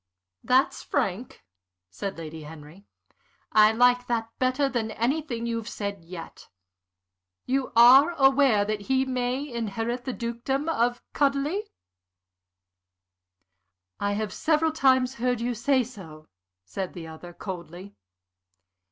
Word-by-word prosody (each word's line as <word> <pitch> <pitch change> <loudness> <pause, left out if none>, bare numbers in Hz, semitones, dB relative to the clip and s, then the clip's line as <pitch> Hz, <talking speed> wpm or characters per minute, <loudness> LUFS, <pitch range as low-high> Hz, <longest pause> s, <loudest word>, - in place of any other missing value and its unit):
"That's 260 +2 +2
frank," 240 -4 -3 0.5
said 195 - -5
Lady 160 -1 -8
Henry. 155 +5 -12 0.6
"I 215 0 +6
like 245 +2 +3
that 230 -1 -2
better 255 +2 +2
than 235 -4 -2
anything 240 +1 -2
you've 230 -1 -3
said 200 -3 -5
yet. 165 0 -10 1.0
You 265 0 -1
are 265 +8 +8
aware 270 -6 +4
that 210 0 -2
he 265 0 +2
may 255 +2 -2
inherit 235 0 -3
the 260 - -3
dukedom 240 +5 -3
of 240 -5 0
Chudleigh?" 290 +9 0 2.3
"I 205 0 0
have 210 -1 -3
several 320 0 +1
times 260 -4 +3
heard 250 -1 +1
you 240 +1 -1
say 255 +3 +2
so," 165 -10 -12 0.4
said 185 - -5
the 170 -2 -8
other, 160 +2 -10
coldly. 180 +1 -8
235 Hz, 115 wpm, -26 LUFS, 200-265 Hz, 2.3 s, are